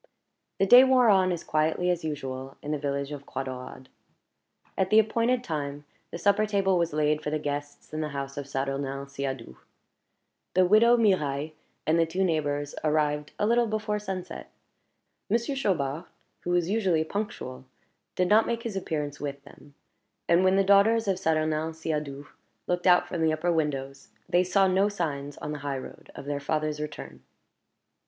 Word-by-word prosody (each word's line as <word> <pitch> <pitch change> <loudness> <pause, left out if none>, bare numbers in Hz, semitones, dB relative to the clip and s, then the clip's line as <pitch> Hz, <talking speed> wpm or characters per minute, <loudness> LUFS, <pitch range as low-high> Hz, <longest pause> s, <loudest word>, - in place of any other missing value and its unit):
The 195 - +3
day 245 +6 +9
wore 255 -3 +5
on 190 -2 +4
as 170 -2 -3
quietly 160 +3 +1
as 175 -2 -2
usual 135 -3 -5
in 150 - -4
the 150 - -1
village 140 0 -2
of 140 -1 -8
Croix 135 - -4
Daurade. 130 0 -8 0.9
At 190 -1 0
the 215 - +5
appointed 230 +3 +2
time 145 -5 -4 0.2
the - - -6
supper 200 +4 +2
table 195 -3 +2
was 170 -1 0
laid 150 0 +1
for 150 - -3
the 155 - 0
guests 145 0 -5
in 155 - -2
the 155 - -2
house 140 -1 -5
of 140 -1 -6
Saturnin 135 0 -3
Siadoux. 135 - -5 1.0
The 185 0 +5
widow 225 +5 +5
Mirailhe 155 -9 +1 0.3
and 160 +2 +3
the 165 - +3
two 180 +4 -1
neighbors 145 -4 -1
arrived 150 -1 0
a - - +1
little 235 +2 +3
before 215 -1 -2
sunset. 190 -3 -6 0.8
Monsieur 235 +6 0
Chaubard, 170 - -1 0.3
who - - -6
was 175 -1 +2
usually 190 -6 +1
punctual, 160 -9 -5 0.5
did 180 - +1
not 215 +4 +4
make 230 0 -2
his 225 -4 -4
appearance 150 -6 -3
with 140 -1 -5
them; 145 0 -17 0.5
and 170 +2 +4
when 185 0 +4
the 195 - +4
daughters 200 +3 +4
of 190 -2 0
Saturnin 155 -1 0
Siadoux 150 -3 -4 0.4
looked 180 +1 -1
out 180 -1 +5
from 175 - -3
the 160 -1 +3
upper 175 +3 0
windows, 140 -4 -2 0.2
they 175 +1 +3
saw 190 +2 +3
no 190 +2 +3
signs 145 -7 -4
on 150 - -5
the 150 - -5
high 140 -1 -3
road 130 - -10
of - - -8
their 145 0 -2
father's 150 +1 -2
return. 150 0 -7
160 Hz, 175 wpm, -27 LUFS, 145-195 Hz, 1.0 s, day